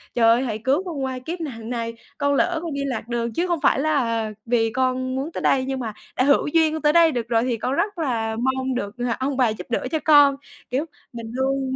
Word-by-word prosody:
"Trời 235 - +3
ơi, 235 +3 +4
hãy 220 -4 -3
cứu 270 - +1
con 305 -7 -4
qua 260 -1 -3
kiếp 335 +7 -6
nạn 230 -7 -6
này, 230 -1 -3 0.2
con 285 0 +1
lỡ 330 +4 +1
con 330 -4 -4
đi 280 - -3
lạc 250 -5 -3
đường 235 -1 -2
chứ 345 +9 0
không 345 -3 0
phải - - +3
là 230 -8 0
vì 230 -1 +1
con 255 0 0
muốn 280 +5 -3
tới - - -5
đây, 260 -1 +2
nhưng 265 -1 -2
mà 225 -3 -4 0.2
đã 255 - +2
hữu 280 +1 +3
duyên 315 0 +3
con 315 - -3
tới 300 0 +3
đây 335 -1 +6
được 240 -4 -3
rồi 230 -1 +2
thì 245 -2 -1
con 250 +4 -2
rất 405 +5 -1
là 230 -8 -1
mong 260 0 0
được, 205 -2 -4
ờ, 245 -1 -1
ông 265 +1 -1
bà 250 -3 +4
giúp 215 - -6
đỡ 245 +2 -1
cho 315 - 0
con." 290 -2 +7 0.4
Kiểu, 270 +5 0 0.3
mình 230 -1 -7
luôn 265 +1 -1
260 Hz, 255 wpm, -23 LUFS, 235-290 Hz, 0.4 s, con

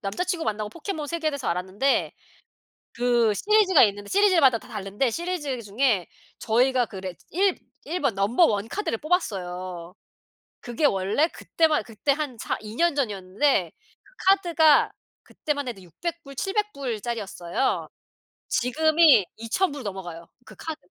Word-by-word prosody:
남자친구 330 - -2
만나고 215 -1 -2
포켓몬 315 - -5
세계에 320 0 -1
대해서 280 -3 -5
알았는데 190 +10 0 0.8
그 240 -3 +2
시리즈가 390 - +4
있는데 205 -1 0
시리즈마다 345 - +4
다 - - -16
다른데 210 +2 -2
시리즈 300 -2 -3
중에 210 -2 +1 0.3
저희가 245 +2 +2
그 200 - -10
레 185 -2 -6 0.2
1- 380 +2 +2 0.3
1 355 +1 -3
번 275 -5 +1
넘버 205 - +3
1 205 -5 0
카드를 330 - -2
뽑았어요. 185 - -3 0.7
그게 240 +5 -1
원래 200 +6 +2
그때만 320 -2 +1
그때 230 +5 -1
한 285 -4 -4
4 - - -3
2 215 +1 -9
년 340 +1 +2
전이었는데 200 - 0 0.3
그 - - -24
카드가 340 -6 +4 0.3
그때만 285 -3 -4
해도 200 -5 -8
600 330 - -6
불 275 -1 -11
700 415 +7 -1
불짜리였어요. 230 -5 -3 0.6
지금이 310 - +4
2000 230 +12 0
불 285 - -7
넘어가요 180 -5 -7 0.2
그 - - -13
카드. 320 -1 -5
250 Hz, 285 characters per minute, -25 LUFS, 205-320 Hz, 0.8 s, 시리즈가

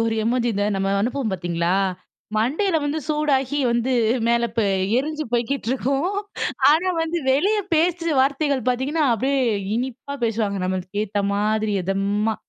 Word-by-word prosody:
ஒரு 225 - -1
எமோஜி 240 +1 +1
இந்த 205 +1 0
நம்ம 195 0 0
அனுப்புவோம் 240 -1 -1
பார்த்தீங்களா, 175 -1 -1 0.6
மண்டையில 315 - +1
வந்து 290 +2 -1
சூடாகி 290 -2 +1
வந்து 235 +2 0 0.4
மேல 235 0 +3
ப - - +3 0.4
எரிஞ்சு 305 +3 -2
போய்க்கிட்டு 240 +1 -1
இருக்கும். 275 - 0 0.5
ஆனா, 330 +5 +3
வந்து 325 +1 -1
வெளியே 400 +10 +2
பேச்சு 335 +1 +1
வார்த்தைகள் 275 -2 +1
பார்த்தீங்கன்னா, 270 +6 0
அப்படியே 270 +5 0 0.4
இனிப்பா 260 +3 -4
பேசுவாங்க 215 -3 -1
நம்மளுக்கேத்த 200 +3 -2
மாதிரி 215 +1 0
எதமா. 200 +4 0
250 Hz, 130 wpm, -22 LUFS, 210-295 Hz, 0.6 s, மேல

